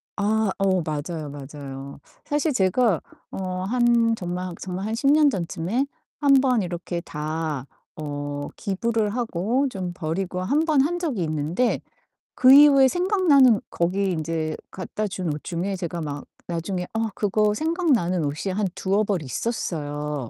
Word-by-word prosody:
아. 215 Hz, +1 st, +1 dB
어 190 Hz, -2 st, +2 dB
맞아요, 155 Hz, 0 st, -4 dB
맞아요. 140 Hz, -1 st, -8 dB, 0.3 s
사실 295 Hz, +1 st, 0 dB
제가 195 Hz, -2 st, +2 dB, 0.3 s
어 185 Hz, -1 st, -3 dB
한 235 Hz, +1 st, +3 dB
정말 180 Hz, -2 st, -4 dB
정말 190 Hz, +1 st, -4 dB
한 220 Hz, -, -2 dB
10 275 Hz, +4 st, +3 dB
년 300 Hz, -1 st, +6 dB
전쯤에 190 Hz, +5 st, -1 dB, 0.3 s
1 285 Hz, -2 st, +4 dB
번 250 Hz, -4 st, +2 dB
이렇게 175 Hz, 0 st, -4 dB
다 155 Hz, -3 st, -3 dB, 0.3 s
어 145 Hz, -1 st, -4 dB
기부를 220 Hz, +1 st, -1 dB
하고 235 Hz, +3 st, 0 dB
좀 185 Hz, -5 st, -4 dB
버리고 180 Hz, +2 st, -3 dB
1 290 Hz, +12 st, +1 dB
번 300 Hz, -4 st, +4 dB
한 350 Hz, +2 st, -1 dB
적이 275 Hz, -, -1 dB
있는데 155 Hz, +10 st, 0 dB, 0.5 s
그 260 Hz, +1 st, +7 dB
이후에 280 Hz, -2 st, +8 dB
생각나는 330 Hz, -, +4 dB
거기 190 Hz, +3 st, 0 dB
이제 155 Hz, -1 st, -2 dB, 0.2 s
갖다 200 Hz, +3 st, -4 dB
준 185 Hz, -5 st, -3 dB
옷 150 Hz, -, -7 dB
중에 185 Hz, +3 st, -2 dB
제가 175 Hz, -2 st, -4 dB
막 145 Hz, -2 st, -5 dB, 0.2 s
나중에 180 Hz, +2 st, -3 dB
어 225 Hz, 0 st, 0 dB
그거 210 Hz, 0 st, +2 dB
생각나는 275 Hz, -, +1 dB
옷이 155 Hz, +7 st, -2 dB
한 205 Hz, 0 st, 0 dB
두어 200 Hz, +3 st, +1 dB
벌 195 Hz, -6 st, -1 dB
있었어요. 150 Hz, -, -3 dB
190 Hz, 255 characters per minute, -24 LUFS, 160-235 Hz, 0.5 s, 이후에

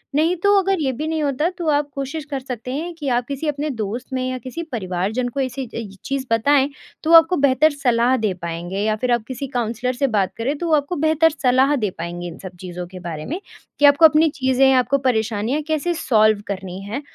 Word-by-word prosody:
नहीं 320 Hz, +4 st, +3 dB
तो 405 Hz, 0 st, +5 dB
अगर 385 Hz, -1 st, 0 dB
ये 270 Hz, -3 st, +1 dB
भी 300 Hz, +6 st, -4 dB
नहीं 315 Hz, -1 st, -1 dB
होता 290 Hz, +3 st, 0 dB
तो 345 Hz, -3 st, -4 dB
आप 290 Hz, -1 st, +1 dB
कोशिश 280 Hz, +3 st, -4 dB
कर 275 Hz, -, -1 dB
सकते 250 Hz, -2 st, -6 dB
हैं 340 Hz, +4 st, -4 dB
कि 295 Hz, -4 st, -4 dB
आप 245 Hz, 0 st, +1 dB
किसी 280 Hz, +2 st, -4 dB
अपने 295 Hz, +1 st, -2 dB
दोस्त 230 Hz, -1 st, -4 dB
में 255 Hz, 0 st, -1 dB
या 255 Hz, -, -3 dB
किसी 255 Hz, +7 st, -6 dB
परिवारजन 205 Hz, +2 st, -2 dB
को 275 Hz, -, -5 dB
ऐसी 260 Hz, 0 st, -3 dB, 0.4 s
चीज़ 275 Hz, -1 st, -2 dB
बताएँ 275 Hz, +4 st, +3 dB, 0.3 s
तो 315 Hz, -, -1 dB
वो 335 Hz, -, +11 dB
आपको 330 Hz, +2 st, +4 dB
बेहतर 280 Hz, +2 st, +4 dB
सलाह 250 Hz, -3 st, +2 dB
दे 215 Hz, -4 st, 0 dB
पाएँगे 170 Hz, +3 st, -4 dB
या 215 Hz, 0 st, +1 dB
फिर 245 Hz, +3 st, -2 dB
आप 235 Hz, -2 st, 0 dB
किसी 260 Hz, +1 st, -5 dB
काउंसलर 240 Hz, +2 st, -1 dB
से 275 Hz, +2 st, 0 dB
बात 195 Hz, -2 st, 0 dB
करें 270 Hz, +6 st, -1 dB
तो 345 Hz, -, -3 dB
वो 325 Hz, -, +1 dB
आपको 290 Hz, +4 st, -1 dB
बेहतर 320 Hz, +1 st, +4 dB
सलाह 260 Hz, +3 st, +4 dB
दे 215 Hz, -7 st, 0 dB
पाएँगे 175 Hz, +1 st, -5 dB
इन 170 Hz, -, -9 dB
सब 185 Hz, -1 st, -10 dB
चीज़ों 180 Hz, -1 st, -6 dB
के 185 Hz, 0 st, -10 dB
बारे 165 Hz, -3 st, -6 dB
में, 335 Hz, +6 st, -4 dB, 0.4 s
कि 290 Hz, -, +5 dB
आपको 285 Hz, +3 st, +7 dB
अपनी 315 Hz, +1 st, +5 dB
चीज़ें, 265 Hz, -1 st, +2 dB
आपको 260 Hz, +2 st, +3 dB
परेशानियाँ 235 Hz, 0 st, 0 dB
कैसे 315 Hz, +2 st, 0 dB
सॉल्व 215 Hz, -8 st, +3 dB
करनी 190 Hz, -2 st, -5 dB
है 220 Hz, +8 st, -4 dB
260 Hz, 225 wpm, -21 LUFS, 220-295 Hz, 0.4 s, वो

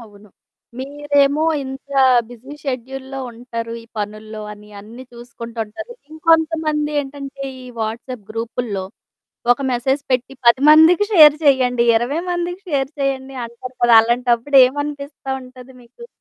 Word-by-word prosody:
అవును. 210 Hz, -2 st, -16 dB, 0.5 s
మీరేమో 285 Hz, +1 st, +1 dB, 0.2 s
ఇంత 265 Hz, +1 st, -9 dB, 0.4 s
బిజీ 245 Hz, +3 st, -12 dB
షెడ్యూల్‌లో 265 Hz, +1 st, -5 dB
ఉంటారు. 230 Hz, -1 st, -6 dB
ఈ -, -, -16 dB
పనుల్లో 215 Hz, +1 st, -6 dB
అని 210 Hz, 0 st, -14 dB
అన్నీ 225 Hz, +5 st, -12 dB
చూసుకుంటూ 235 Hz, -1 st, -10 dB
ఉంటారు. 330 Hz, -, -9 dB, 0.2 s
ఇంకొంతమంది 315 Hz, -2 st, +1 dB
ఏంటంటే 275 Hz, 0 st, -8 dB, 0.2 s
ఈ -, -, -11 dB, 0.2 s
వాట్సప్ 225 Hz, +1 st, -5 dB
గ్రూపుల్లో. 225 Hz, -3 st, -4 dB, 0.7 s
ఒక 260 Hz, -, -6 dB
మెసేజ్ 265 Hz, +3 st, 0 dB
పెట్టి 255 Hz, +1 st, 0 dB
10 235 Hz, +2 st, +6 dB
మందికి 320 Hz, +6 st, +6 dB
షేర్ 305 Hz, -5 st, +8 dB
చేయండి. 255 Hz, -4 st, +3 dB
20 255 Hz, +8 st, -1 dB
మందికి 350 Hz, +1 st, -3 dB
షేర్ 275 Hz, -2 st, 0 dB
చేయండి 270 Hz, -1 st, -2 dB
అంటారు 245 Hz, +2 st, -10 dB
కదా! 240 Hz, 0 st, +5 dB
అలాంటప్పుడు 240 Hz, +3 st, +1 dB
ఏమనిపిస్తా 285 Hz, +1 st, -6 dB
ఉంటది 255 Hz, 0 st, -14 dB
మీకు? 470 Hz, -, -14 dB
260 Hz, 125 wpm, -19 LUFS, 235-290 Hz, 0.7 s, షేర్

